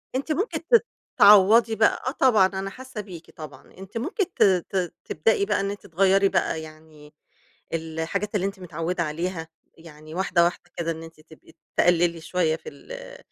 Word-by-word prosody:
أنتِ 280 +4 -2
ممكن 390 +10 -1
ت 470 0 +6 0.3
تعوّضي 210 +3 +7
بقى 220 - +2
آه - - +1
طبعًا 240 -9 +4
أنا 195 0 -5
حاسّة 255 -1 -8
بيكِ 180 -5 -12
طبعًا، 155 -3 -11
أنتِ 195 +4 -8
ممكن 355 - -1
ت - - +3 0.3
ت 185 -3 -2
تبدئي 200 +5 +1
بقى - - 0
إن 195 0 -1
أنتِ 205 - -9
تغيَّري 195 +3 +3
بقى 160 - 0
يعني 155 -1 -14 0.6
الحاجات 165 +6 -3
اللي 195 -1 +1
أنتِ 195 -1 -4
متعوّدة 170 0 -3
عليها 165 +2 -4 0.3
يعني 155 -1 -13
واحدة، 180 -2 +2
واحدة 175 0 -4
كده 165 -1 -1
إن 165 0 -7
أنتِ 165 -1 -14
تبقي 160 0 -19 0.2
تقلّلي 170 -1 +3
شوية 165 -1 0
في - - -10
ال - - -11
180 Hz, 170 wpm, -24 LUFS, 160-210 Hz, 0.6 s, تعوّضي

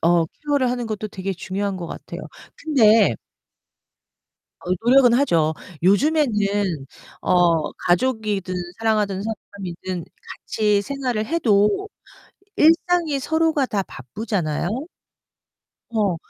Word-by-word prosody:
어 170 0 +4
케어를 285 - -1
하는 245 -1 -2
것도 215 -1 -4
되게 190 0 -4
중요한 195 +2 -3
것 175 - -6
같아요. - - -8 0.4
근데 225 -8 +4 1.5
어, 180 - -2
노력은 250 0 +6
하죠. 170 - +2 0.3
요즘에는 205 - +2 0.4
어, 170 -3 +2
가족이든 205 -1 0 0.2
사랑하는 210 -4 0
사람이든 190 -5 -6 0.4
같이 210 -2 +1
생활을 250 -3 -2
해도 220 - +2 0.7
일상이 330 -2 +3
서로가 320 -1 +1
다 200 -5 -1
바쁘잖아요? 165 - -3 1.2
어, 205 -6 +1
210 Hz, 230 characters per minute, -22 LUFS, 185-260 Hz, 1.5 s, 노력은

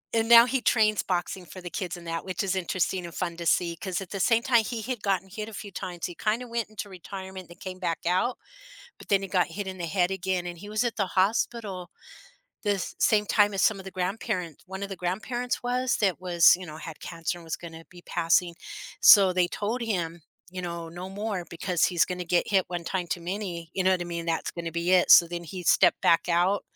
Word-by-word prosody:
And 225 0 +1
now 235 0 +10
he 260 +1 -1
trains 215 -3 +3
boxing 180 0 -2
for 175 +2 -11
the 175 -1 -8
kids 180 -2 -4
and 170 - -12
that, 165 0 -3
which 185 0 -3
is 195 -1 -1
interesting 185 0 -1
and 170 -3 -9
fun 170 +2 -3
to 170 -1 -4
see 170 0 +2
'cause 185 +1 -3
at 190 -3 -8
the 195 - -4
same 230 +5 +3
time 240 -4 +4
he 225 0 -4
had 245 -2 -4
gotten 195 -2 0
hit 210 +3 -6
a - - -12
few 205 -1 -8
times, 175 -2 -5
he 175 - -5
kinda 225 +7 -1
went 230 -3 -3
into 215 -1 -6
retirement 190 0 -9
and 175 - -14
came 185 -1 -7
back 170 -3 -3
out, 185 +8 +1 0.6
but - - -15
then 195 -1 +3
he 195 - -5
got 180 -1 +2
hit 195 +4 -5
in 190 0 -6
the 175 - -3
head 180 +1 +1
again 185 -1 -2
and 175 -1 -6
he 205 - -10
was 215 +3 0
at 235 - -1
the 200 - +1
hospital 195 -2 0 0.7
the 205 -2 +1 0.2
same 210 -2 +3
time 205 -1 +3
as 195 - +1
some 215 -3 +3
of 190 - -10
the 190 - -7
grandparent 185 - -3
one 190 +1 -6
of 200 - -5
the 195 - -5
grandparents 230 +9 -3
was 250 +1 0
that 195 -4 0
was, 175 -2 +6
you 185 - -9
know, 155 -2 -9
had 160 -1 -9
cancer 170 +1 -4
and - - -14
was 165 -1 -3
gonna 165 -1 -10
be 175 -1 -15
passing, 170 +1 +2 0.5
so 195 -3 +8
they 180 -1 +2
told 220 +7 -3
him, 175 -7 -2 0.3
you 185 0 -5
know, 170 -1 -5
no 175 +3 -7
more 200 -1 -3
because 175 0 0
he's 175 -2 +2
gonna 180 -1 -4
get 175 +1 +1
hit 190 -3 +3
one 175 -1 -4
time 180 0 -3
too 170 +1 -3
many, 175 -2 -5
you 190 - -1
know 185 - +4
what 185 - +1
I - - -1
mean, 170 -1 -5
that's 165 - -1
gonna 170 -1 -5
be 170 +2 -1
it. 180 -1 +4
So 170 - +9
then 175 0 -5
he 180 +2 -7
stepped - - +4
back 170 +1 +3
out 175 +4 +2
185 Hz, 245 wpm, -27 LUFS, 175-205 Hz, 0.7 s, now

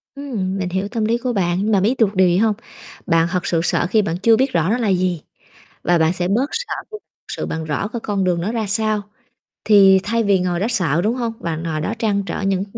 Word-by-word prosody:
Ừm, 215 -10 -3
mình 185 -2 -2
hiểu 190 +2 -2
tâm 220 0 -2
lý 230 +2 +1
của 245 0 -3
bạn, 190 +1 0
mà 200 - +4
biết 230 +7 +1
được 210 -3 +2
điều 185 0 +4
gì 175 +1 +2
hông? 220 +1 +3 0.5
Bạn 165 0 +2
thật 180 -2 -1
sự 165 -2 +1
sợ 175 - +1
khi 215 +3 +3
bạn 170 -3 -2
chưa 225 +4 +4
biết 265 0 0
rõ 165 +3 +1
nó 230 - +2
là 230 -4 -1
gì 180 -3 0 0.6
và 175 -1 +2
bạn 160 +1 +3
sẽ 180 -1 -2
bớt 245 +9 +1
sợ 465 +3 -3 0.2
khi 430 - -6
thực - - -15
sự - - -4
bạn 160 0 -4
rõ 155 +6 -2
cái 235 0 -5
con 200 -3 -1
đường 175 -2 +1
nó 205 +6 -2
ra 225 -2 -2
sao. 215 +1 0 0.6
Thì 195 -3 +6
thay 230 +3 0
vì 200 -2 +3
ngồi 180 -1 -1
đó 205 - 0
sợ, 170 - +1
đúng 225 +4 +1
hông? 235 -3 -2
Bạn 165 -1 -4
ngồi 155 -2 -3
đó 205 - -2
trăn 205 -3 0
trở - - -4
những 195 -1 0
195 Hz, 260 wpm, -20 LUFS, 175-225 Hz, 0.6 s, Thì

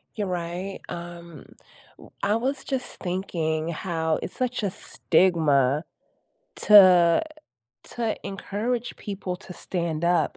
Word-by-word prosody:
You're 210 -2 -2
right, 180 +2 -4
um, 170 -2 -8 0.5
w - - -15
I 205 +2 +2
was 265 +4 -1
just 260 -2 -3
thinking 170 -4 -2
how 160 -1 -1
it's - - -6
such 250 -2 -1
a 200 - 0
stigma 155 -7 +2 0.8
to 185 - +8 0.6
to 230 -2 -3
encourage 220 +5 -3
people 195 -3 -5
to 180 - -11
stand 170 -2 -3
up 170 -2 +2
180 Hz, 115 wpm, -25 LUFS, 170-205 Hz, 0.8 s, to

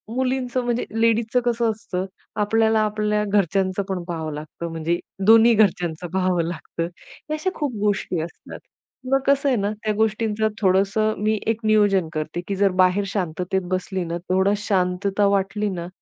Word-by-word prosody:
मुलींचं 255 -1 -1
म्हणजे 240 0 0 0.2
लेडीजचं 230 +2 +2
कसं 235 -1 +1
असतं, 190 -3 -4 0.4
आपल्याला 220 +1 +3
आपल्या 210 0 0
घरच्यांचं 195 -1 +1
पण 180 -2 -2
पाहावं 160 -3 -4
लागतं, 155 +3 -7
म्हणजे 165 +1 -1 0.3
दोन्ही 225 +1 +7
घरच्यांच 180 -6 +2
पाहावं 185 -2 +1
लागतं, 165 0 -4 0.5
अशा 340 +5 -1
खूप 290 -5 -2
गोष्टी 200 -5 0
असतात. 170 - -9 0.5
मग 270 - +4
कसं 280 0 +3
आहे 255 - +3
ना, 200 +1 0
त्या 215 -1 +1
गोष्टींच 220 0 0 0.2
थोडंस 195 +1 +3 0.2
मी 215 0 0
एक 225 0 +1
नियोजन 205 -5 +3
करते, 155 +2 -3
की 200 - -2
जर 200 -1 +3
बाहेर 185 +2 +3
शांततेत 185 0 -2
बसली 185 0 -2
ना, 170 +1 -3
थोडा 190 +2 +3
शांतता 195 0 +1
वाटली 200 +1 0
ना, 175 -2 -5
200 Hz, 155 wpm, -22 LUFS, 180-220 Hz, 0.5 s, दोन्ही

